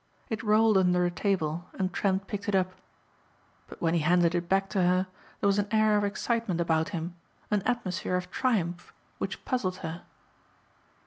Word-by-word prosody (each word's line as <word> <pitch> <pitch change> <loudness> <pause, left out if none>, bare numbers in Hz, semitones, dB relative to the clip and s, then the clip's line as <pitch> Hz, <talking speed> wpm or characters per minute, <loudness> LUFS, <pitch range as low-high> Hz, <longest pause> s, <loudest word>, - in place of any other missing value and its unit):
It 220 0 -1
rolled 215 -1 +4
under 180 -1 +3
a 175 - 0
table 175 -2 -1
and 185 -1 -1
Trent 195 -1 0
picked 205 0 -4
it 200 - +2
up. 185 -1 +1 0.9
But - - -10
when 165 0 +2
he 170 - +3
handed 175 +2 +3
it 175 0 -2
back 195 0 +2
to 195 - 0
her 180 +1 +3 0.3
there - - -2
was 200 0 +3
an 205 - 0
air 215 -1 +3
of 205 - +2
excitement 205 -2 -1
about 160 -1 +1
him, 170 -2 -4 0.4
an 210 -1 +2
atmosphere 210 -6 -1
of 180 0 -3
triumph 180 -9 -1 0.2
which - - -4
puzzled 190 -8 -1
her. 165 +2 -5
185 Hz, 180 wpm, -28 LUFS, 175-210 Hz, 0.9 s, rolled